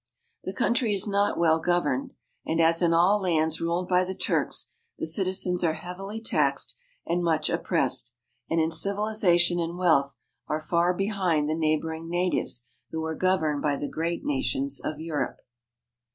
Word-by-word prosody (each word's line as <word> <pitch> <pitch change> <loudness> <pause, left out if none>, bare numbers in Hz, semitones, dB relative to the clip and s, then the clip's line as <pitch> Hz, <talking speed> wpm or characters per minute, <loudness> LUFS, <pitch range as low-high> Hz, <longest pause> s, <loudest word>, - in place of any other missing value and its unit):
The 190 - -3
country 235 -3 +1
is 195 - +2
not 200 0 +1
well 160 -1 +3
governed, 175 +11 0 0.3
and, 160 - -1
as 165 +1 +4
in 170 -1 +3
all 180 +5 +4
lands 160 -3 +1
ruled 170 +2 -1
by 180 0 +3
the 190 +1 -4
Turks, - - -1 0.3
the - - -3
citizens 180 +1 +1
are 160 -2 +2
heavily 195 +5 -6
taxed 225 - 0 0.3
and 175 +1 0
much 155 -2 +1
oppressed, 115 +1 0 0.3
and 165 - +1
in 160 0 +1
civilization 180 -1 +2
and 170 +1 -3
wealth 140 -7 +2 0.3
are 155 - -1
far 170 +3 +1
behind 185 -6 0
the 155 - 0
neighboring 160 +1 -1
natives 175 -8 0 0.3
who 160 0 -3
are 160 - -2
governed 160 -5 +1
by 145 -1 +1
the 145 - -4
great 170 +2 -2
nations 135 0 -1
of 155 -1 -4
Europe. 160 -2 -3
170 Hz, 160 wpm, -26 LUFS, 160-185 Hz, 0.3 s, as